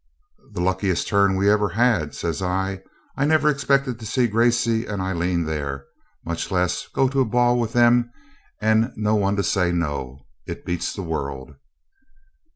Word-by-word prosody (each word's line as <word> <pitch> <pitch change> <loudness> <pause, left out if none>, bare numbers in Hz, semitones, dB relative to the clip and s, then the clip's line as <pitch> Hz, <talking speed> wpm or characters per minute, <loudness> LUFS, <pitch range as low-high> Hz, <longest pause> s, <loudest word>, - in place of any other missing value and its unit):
'The 85 - -3
luckiest 95 0 0
turn 100 -1 +3
we've 95 +1 +1
ever 105 -1 +3
had,' 105 -7 +1
says 85 +3 -3
I. 95 +1 -2 0.4
'I 140 - +1
never 155 0 +3
expected 135 -3 +1
to 110 - -9
see 125 +3 +1
Gracey 115 0 +2
and 100 -2 -4
Aileen 90 -2 -1
there, 70 -3 -4 0.4
much 85 0 -3
less 90 -2 0
to - - -24
go 135 - +3
to 135 +1 0
a - - +3
ball 120 +1 +2
with 115 -1 -2
them 120 0 +4 0.5
and 110 +3 +2
no 105 0 +1
one 100 -1 +1
to 100 - 0
say 90 -1 +1
no. 70 -6 -3 0.2
It - - -7
beats 90 -1 -3
the 95 - -5
world.' 70 -4 -5
100 Hz, 170 wpm, -22 LUFS, 85-120 Hz, 0.5 s, them